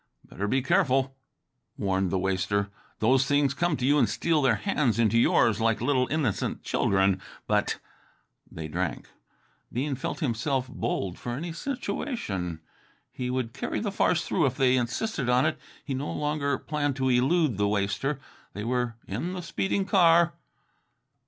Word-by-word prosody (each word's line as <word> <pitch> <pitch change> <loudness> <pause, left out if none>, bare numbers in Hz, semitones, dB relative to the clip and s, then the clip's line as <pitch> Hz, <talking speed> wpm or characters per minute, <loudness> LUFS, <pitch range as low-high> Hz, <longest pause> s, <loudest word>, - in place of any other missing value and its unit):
"Better 100 +3 -4
be 130 +4 +1
careful," 135 -7 +2 0.6
warned 95 -1 0
the 95 - 0
waster. 95 +2 0 0.3
"Those 130 +4 +3
things 145 -1 +3
come 175 0 0
to 125 - -1
you 145 +2 +4
and - - +3
steal 165 -3 +1
their 130 -5 +4
hands 115 +2 0
into 115 -1 +3
yours 115 -2 +3
like 115 -1 +2
little 130 0 +2
innocent 145 -10 -1
children, 95 -1 +2 0.2
but - - +1 0.4
". - - -38
They 80 -1 -6
drank. 90 +4 -3 0.6
Bean 135 +4 -1
felt 135 - -4
himself 130 -1 -1
bold 95 -7 -3
for 120 - -4
any 165 +6 -4
situation. 170 - -3 0.5
He 125 -1 -4
would 125 -2 -2
carry - - -3
the 210 -2 -2
farce 175 -3 +1
through 165 -6 +2
if 125 - -3
they 130 -2 +4
insisted 130 - -1
on 125 +1 +4
it. - - 0 0.3
He 140 - -3
no 135 +3 -3
longer 150 -2 -1
planned 145 -3 -2
to 130 -1 0
elude 130 - +2
the 105 - +3
waster. 100 +7 -1 0.3
They 105 - -5
were 120 0 -1
in 125 - -3
the 180 - -4
speeding 195 +3 -1
car. 170 -3 +5
130 Hz, 160 wpm, -27 LUFS, 110-150 Hz, 0.6 s, car